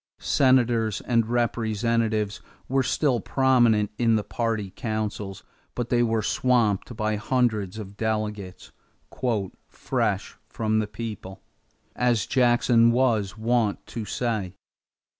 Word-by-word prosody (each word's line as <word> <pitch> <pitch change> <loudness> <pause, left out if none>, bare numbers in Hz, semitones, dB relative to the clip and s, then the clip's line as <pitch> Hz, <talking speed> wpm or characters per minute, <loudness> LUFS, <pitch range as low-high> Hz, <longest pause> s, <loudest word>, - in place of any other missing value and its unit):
Senators 120 -5 +2
and 115 -2 +1
Representatives 115 -2 0 0.3
were 135 +1 +2
still 130 0 +1
prominent 120 -7 +3
in 115 -2 +3
the 105 - 0
party 110 -2 -2
councils, 105 -4 -4 0.3
but 120 -1 -3
they 120 -1 +2
were 115 -2 +1
swamped 120 -3 +1
by 110 0 0
hundreds 110 -4 0
of 100 -2 -8
delegates 105 -4 -3 1.0
"fresh - - -2
from 110 -1 0
the 110 - -1
people," 105 -3 -7 0.5
as 120 -3 +1
Jackson 120 -2 +4
was 110 -6 +1
wont 110 -2 0
to 115 - -6
say. 105 -5 -3
110 Hz, 110 wpm, -25 LUFS, 105-120 Hz, 1.0 s, Jackson